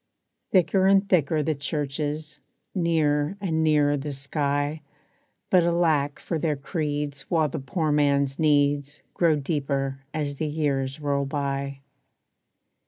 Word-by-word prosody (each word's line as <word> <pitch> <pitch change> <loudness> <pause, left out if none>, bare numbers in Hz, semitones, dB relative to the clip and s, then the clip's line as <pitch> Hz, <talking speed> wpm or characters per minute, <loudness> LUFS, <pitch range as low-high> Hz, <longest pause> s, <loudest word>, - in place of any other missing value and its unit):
Thicker 185 +1 +3
and 195 +1 +4
thicker 155 -4 +2
the 155 - +1
churches, 150 +1 -3 0.3
Nearer 160 -1 +1
and 160 -5 0
nearer 145 -2 +3
the 145 +1 -4
sky 145 +2 -1 0.7
But 185 - +6
alack 165 -4 +1
for 165 - -3
their 155 -1 0
creeds 145 -2 -3
while 160 -3 +2
the - - -4
poor 155 +4 -1
man's 140 -2 +2
needs 145 -2 +2
Grow 165 -3 +3
deeper 135 -2 -2
as 145 -2 -3
years 145 -3 -1
roll 140 -1 0
by. 140 -1 -3
145 Hz, 120 wpm, -25 LUFS, 140-160 Hz, 0.7 s, But